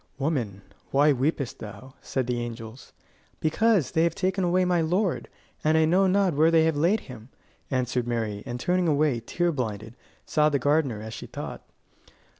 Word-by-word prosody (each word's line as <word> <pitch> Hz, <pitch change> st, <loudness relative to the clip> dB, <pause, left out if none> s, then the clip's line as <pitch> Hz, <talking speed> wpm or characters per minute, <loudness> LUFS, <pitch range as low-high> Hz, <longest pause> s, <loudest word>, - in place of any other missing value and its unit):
"Woman, 125 Hz, -10 st, -2 dB, 0.3 s
why 145 Hz, +2 st, +4 dB
weepest 140 Hz, 0 st, -1 dB
thou?" 130 Hz, +5 st, -10 dB
said 130 Hz, -2 st, -2 dB
the 120 Hz, 0 st, -1 dB
angels. 115 Hz, +1 st, -8 dB, 0.5 s
"Because 195 Hz, -, +2 dB
they 160 Hz, -, +2 dB
have 170 Hz, 0 st, +2 dB
taken 190 Hz, 0 st, 0 dB
away 180 Hz, +1 st, +2 dB
my 175 Hz, -2 st, +2 dB
Lord, 180 Hz, +3 st, 0 dB, 0.4 s
and 155 Hz, +1 st, +3 dB
I 160 Hz, -, +4 dB
know 185 Hz, +4 st, +3 dB
not 190 Hz, -1 st, +2 dB
where 155 Hz, +3 st, +4 dB
they 165 Hz, -1 st, +4 dB
have 160 Hz, -1 st, +2 dB
laid 175 Hz, +9 st, +2 dB
him," 125 Hz, -2 st, -11 dB, 0.4 s
answered 125 Hz, -2 st, -1 dB
Mary, 110 Hz, -4 st, -2 dB
and 120 Hz, 0 st, -4 dB
turning 180 Hz, +5 st, +1 dB
away, 145 Hz, -4 st, +2 dB
tear 175 Hz, +9 st, -1 dB
blinded, 115 Hz, -5 st, -4 dB, 0.3 s
saw 150 Hz, 0 st, +3 dB
the 145 Hz, -, +1 dB
gardener, 140 Hz, -7 st, +1 dB
as 110 Hz, 0 st, -7 dB
she -, -, -8 dB
thought. -, -, -7 dB
145 Hz, 175 wpm, -26 LUFS, 120-170 Hz, 0.5 s, why